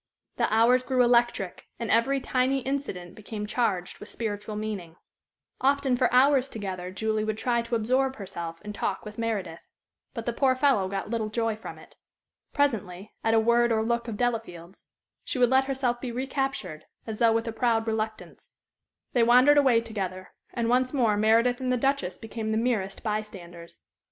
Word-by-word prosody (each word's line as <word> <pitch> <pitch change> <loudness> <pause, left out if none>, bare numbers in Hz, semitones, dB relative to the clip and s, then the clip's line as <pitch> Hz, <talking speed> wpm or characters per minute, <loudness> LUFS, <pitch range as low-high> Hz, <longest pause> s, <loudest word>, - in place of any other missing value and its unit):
The - - +1
hours 235 +3 +4
grew 255 -1 +2
electric, 240 -6 +1
and 230 -1 -3
every 265 +5 +3
tiny 260 +1 0
incident 255 -10 -4
became 215 0 -6
charged 210 -5 -1
with 210 - -10
spiritual 210 -1 -4
meaning. 205 -6 -5 0.6
Often 275 -1 +2
for 250 0 +2
hours 265 +1 +4
together 190 -5 -5
Julie 215 +3 -1
would 215 0 -2
try 235 +1 +1
to 235 0 -3
absorb 260 +4 +1
herself 170 -5 -7
in 210 0 -6
talk - - -3
with 210 +1 -9
Meredith. 200 -8 -3 0.5
But 230 -2 -5
the 240 - -1
poor 260 +1 +2
fellow 255 -8 +2
got 195 +2 -4
little 225 -2 -1
joy 225 0 -1
from 220 - -9
it. - - -17 0.5
Presently, 210 - -1
at 225 0 +3
a - - +6
word 235 +1 +3
or 220 -1 +2
look 235 +1 -1
of 220 -3 -4
Delafield's 210 -7 -3 0.4
she - - -4
would 245 -1 +3
let 265 0 +4
herself 260 -3 -1
be 255 - -4
recaptured, 265 - -3 0.2
as 220 -2 -6
though 230 -1 +5
with 225 +1 -1
a - - -1
proud 225 -2 +1
reluctance; 220 -1 -4 0.6
they 245 - +3
wandered 250 +5 +6
away 255 -5 +4
together; 190 -5 -5 0.2
and 235 -1 -2
once 255 +3 +2
more 230 -6 +3
Meredith 230 +4 +3
and 255 -1 0
the 250 - +2
Duchess 245 -9 0
became 225 0 -5
the 220 - +1
merest 220 -5 -1
by 215 -1 0
standers. 175 -5 -12
230 Hz, 180 wpm, -27 LUFS, 210-250 Hz, 0.6 s, a